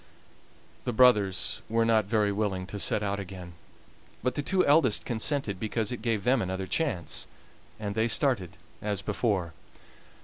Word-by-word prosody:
The 125 - -2
brothers 105 -6 +3
were 115 +1 +2
not 110 -2 +3
very 105 0 +1
willing 100 -3 -1
to 100 +2 -6
set 105 - +1
out 100 0 -1
again, 90 -2 -8 0.7
but 125 - +1
the 145 - -2
two 185 +5 +1
eldest 140 -6 +3
consented 115 -3 -1
because 110 +1 -1
it 125 - -5
gave 110 -3 0
them 125 +1 +3
another 95 0 -3
chance, 95 - -1 0.5
and 105 -2 -3
they 110 +2 +1
started 110 - 0 0.2
as 105 -2 -2
before. 100 -6 -1
105 Hz, 150 wpm, -28 LUFS, 95-120 Hz, 0.7 s, brothers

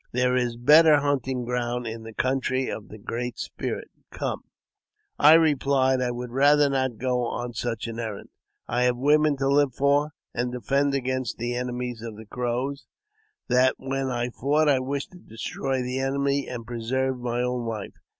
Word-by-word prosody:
There 125 +1 +2
is 120 -2 0
better 150 +5 +7
hunting 130 -3 -1
ground 120 0 -2
in 115 0 -5
the 110 0 -9
country 130 +2 0
of 105 - -6
the 110 - -10
Great 120 +3 -4
Spirit. - - -5 0.2
Come! - - -4 0.4
" - - -68 0.3
I 150 +2 +8
replied 135 -4 +3
I 125 - 0
would 120 0 -5
rather 145 +2 +4
not 130 -4 0
go 125 0 0
on 120 +1 -4
such 115 -1 -3
an 115 0 -5
errand. 110 -4 -5 0.4
I 120 +1 0
have 125 -1 +2
women 150 +2 +3
to 135 0 0
live 140 -2 +3
for, 145 +2 +2 0.2
and 125 +1 -1
defend 140 +3 +1
against 130 -2 -2
the 120 +1 -2
enemies 125 -1 -3
of 115 -2 -7
the 110 - -10
Crows; 125 +5 -3 0.6
that 130 +1 +4
when 135 0 -2
I 120 -1 -1
fought 150 +5 +1
I 140 -3 +4
wished 140 +2 -3
to 180 - -14
destroy 130 +1 -3
the 125 +1 -2
enemy 140 +1 0
and 120 -2 -6
preserve 125 +3 -2
my 120 0 -1
own 125 -1 -2
life. 110 -3 -5
125 Hz, 180 wpm, -25 LUFS, 120-140 Hz, 0.6 s, I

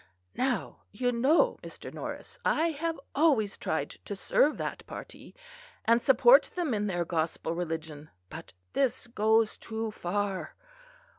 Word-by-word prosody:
Now, 255 -4 -1
you 245 +4 0
know, 290 - +3
Mr. - - -10
Norris, - - -7
I 330 +2 +2
have 325 +1 -3
always 270 -10 +3
tried 145 -2 -2
to 205 - -4
serve 290 +9 +2
that - - -4
party, - - -10 0.5
and 230 +1 +4
support 480 - +6
them 340 -8 0
in 210 -1 0
their 175 -3 -1
gospel 165 -1 -1
religion; 160 -3 -5 0.2
but 95 - -10 0.2
this 265 -3 0
goes 220 -1 +2
too 220 0 -4
far. 200 -1 -3
220 Hz, 135 wpm, -29 LUFS, 175-270 Hz, 0.5 s, support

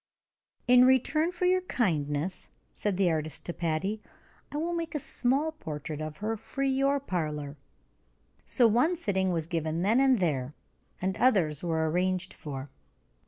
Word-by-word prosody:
"In 250 0 +7
return 260 +6 +3
for 360 0 -2
your 370 +1 +3
kindness," 160 - -1 0.2
said 205 -3 -1
the 185 -3 +3
artist 155 -1 -3
to 175 - -3
Patty, 175 +6 -2 0.5
"I 290 - -4
will 335 +3 -1
make 330 -3 -3
a - - +2
small 275 +3 0
portrait 155 - -6
of 155 0 -5
her 220 +2 -2
for 275 +5 -5
your 275 +1 +2
parlor." 150 - -3 0.9
So 240 - +3
one 250 +11 +3
sitting 190 - 0
was 165 -3 -1
given 165 0 -2
then 220 +6 +4
and 265 -2 +5
there, 145 -7 -1 0.4
and 190 +1 -1
others 180 - +3
were 160 -2 0
arranged 180 +3 0
for. 140 -2 -7
190 Hz, 155 wpm, -29 LUFS, 155-265 Hz, 0.9 s, In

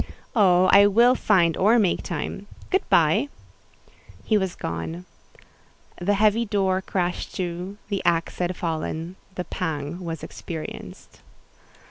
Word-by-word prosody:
"Oh! 185 -4 +5
I 200 +1 +8
will 235 +5 +5
find 175 -9 +3
or 215 +5 +4
make 200 -6 +2
time. 190 +4 -5 0.2
Good 380 - +3
by!" 285 - +3 0.9
He 220 - +1
was 190 -3 0
gone. 85 +1 -5 0.9
The 200 +4 +1
heavy 215 +3 +3
door 195 -3 0
crashed 180 -2 -3
to: 180 +2 -4
the 200 -2 -2
axe 170 -1 0
had 180 0 -1
fallen—the 170 +3 -4
pang 160 -2 -4
was 165 -3 -5
experienced. 160 -2 -8
185 Hz, 120 wpm, -24 LUFS, 170-205 Hz, 0.9 s, I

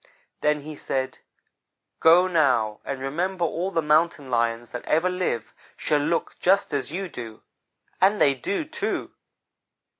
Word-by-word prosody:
Then 150 0 +1
he 155 +1 -8
said, 130 -2 -3 0.8
'go 170 +3 +6
now, 130 - +2
and 135 -1 -4
remember 170 +7 -1
all 170 +4 -2
the 165 -4 0
Mountain 150 -3 +2
lions 115 0 0
that 120 - -6
ever 170 +4 +2
live 180 -11 -2 0.2
shall 150 - +1
look 160 +4 -1
just 195 -3 +2
as 140 0 -2
you 190 +3 -3
do.' 115 -8 -9 0.6
And 200 +3 +4
they 140 - +5
do, 200 - -3
too! 315 - -3
150 Hz, 145 wpm, -25 LUFS, 130-180 Hz, 0.8 s, go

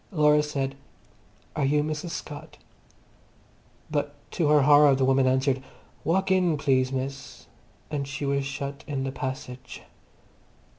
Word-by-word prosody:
Laura 150 -4 +4
said, 140 -3 -2 0.8
"Are 150 - 0
you 145 +2 +2
Mrs. 155 +3 -3
Scott?" 150 -3 -7 1.3
But 145 -1 -1 0.2
to 165 - 0
her 150 -1 +5
horror 145 0 +7
the 130 0 +2
woman 135 0 +3
answered, 130 0 +2 0.4
"Walk 190 +4 +1
in 180 -4 +3
please, 130 -3 +2
miss," 135 +1 -5 0.5
and 140 -2 -2
she 140 +1 -4
was 140 0 +1
shut 140 0 -5
in 140 -3 -2
the 135 - -2
passage. 130 -1 -6
140 Hz, 135 wpm, -26 LUFS, 135-150 Hz, 1.3 s, horror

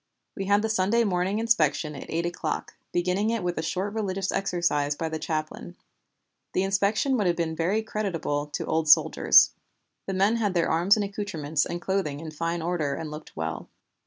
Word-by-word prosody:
We 195 - -3
had 205 +2 +3
the - - +1
Sunday 220 +3 +2
morning 190 0 0
inspection 225 -9 +1
at 140 - -9
eight 170 +1 -1
o'clock, 175 - -3 0.2
beginning 180 +4 0
it 230 -4 -1
with 175 -2 -2
a - - 0
short 190 +5 -2
religious 195 -3 -2
exercise 170 -6 0
by 160 +2 -3
the 160 0 -4
chaplain. 155 - -4 0.8
The 185 - +1
inspection 205 +7 +1
would 205 -5 +1
have 175 - +2
been 165 -2 -2
very 185 +7 0
creditable 170 -9 -2
to 150 - -4
old 160 -1 0
soldiers. - - +6 0.6
The 195 - -2
men 200 +5 +3
had 205 -5 0
their 170 - +2
arms 175 +5 +4
and 210 - 0
accouterments 160 -8 -2
and 175 - -4
clothing 180 -6 -2
in 160 0 -7
fine 165 +2 -3
order 160 -5 -1
and 160 -1 -6
looked 150 +1 -10
well. 80 0 -4
180 Hz, 190 wpm, -26 LUFS, 160-200 Hz, 0.8 s, soldiers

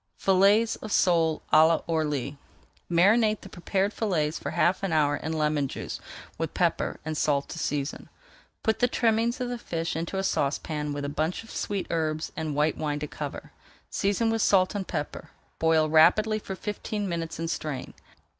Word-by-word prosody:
FILLETS 200 +4 +4
OF 215 - -8
SOLE 165 -5 +2
À 160 +1 +6
L'ORLY 150 -4 -1 0.5
Marinate 215 +5 +4
the 195 - -11
prepared 190 +3 -1
fillets 160 -8 0
for - - -4
half 185 +3 +2
an 195 -2 -2
hour 150 -2 +3
in 155 +2 -4
lemon 150 -2 +1
juice - - -6 0.4
with - - -3
pepper - - 0
and 155 0 -3
salt 145 -2 +1
to 170 - -6
season. 145 -2 -3 0.5
Put 220 0 +1
the 245 - +4
trimmings 230 0 +1
of 250 -1 -2
the 245 -1 -4
fish 165 -6 -3
into 165 +4 -3
a 190 - 0
saucepan 150 -2 -1
with 145 0 -3
a - - -1
bunch 155 +7 -2
of 225 - -13
sweet 200 -2 -2
herbs 155 -1 -1
and 155 -2 -3
white 150 +1 +1
wine 150 -1 -1
to 150 - -3
cover. - - -7 0.4
Season 205 +3 +1
with 225 0 0
salt 185 -2 +4
and 200 -2 -3
pepper, 150 - -4 0.3
boil 160 -1 +3
rapidly 180 +8 +4
for 195 -2 -6
fifteen 210 0 -4
minutes 165 -2 -3
and 165 0 -2
strain. 145 -6 -4
165 Hz, 175 wpm, -27 LUFS, 155-205 Hz, 0.5 s, À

